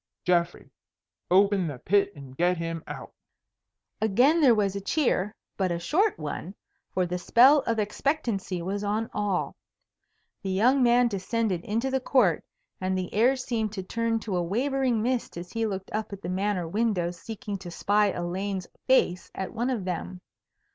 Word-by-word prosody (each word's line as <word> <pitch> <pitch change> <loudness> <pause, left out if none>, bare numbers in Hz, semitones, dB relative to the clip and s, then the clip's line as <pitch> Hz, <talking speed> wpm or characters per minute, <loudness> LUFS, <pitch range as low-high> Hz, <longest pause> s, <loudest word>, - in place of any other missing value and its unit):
Geoffrey, 175 -1 +1 0.6
open 195 -1 +4
the 145 -4 -5
pit 200 +8 +2
and 135 -2 -11
get 175 +4 +2
him 165 -1 -4
out." - - -8 0.9
Again 250 +10 +4
there 255 -6 +6
was 200 -2 +1
a 200 - -3
cheer, 210 - 0 0.2
but 190 -2 0
a 170 - 0
short 355 - +1
one, 155 +5 -5 0.4
for 185 - +1
the 180 +1 -3
spell 260 +10 +6
of 230 - +1
expectancy 210 - -1
was 200 +3 -3
on 215 +2 -1
all. 205 -3 -1 0.9
The 195 - -4
young 240 +8 +3
man 245 0 +5
descended 200 -2 -1
into 230 +6 -1
the 265 - +1
court, 245 - +2 0.4
and 185 0 0
the 185 -1 -4
air 240 +6 +4
seemed 230 -5 -2
to 190 -3 -4
turn 230 +3 -1
to 200 -5 -2
a - - +1
wavering 245 +4 0
mist 245 -6 -1
as 175 +1 -7
he 225 -1 -1
looked 195 -2 -5
up 215 0 -3
at 200 0 -8
the 175 - -4
Manor 190 -1 -1
windows 180 -3 -1
seeking 210 -1 -6
to 180 -2 -8
spy 205 +4 +2
Elaine's 185 +1 -3 0.2
face 185 -9 +2
at 190 -1 -4
one 240 +2 -1
of 230 -8 -2
them. 180 0 -4
200 Hz, 170 wpm, -27 LUFS, 180-230 Hz, 0.9 s, there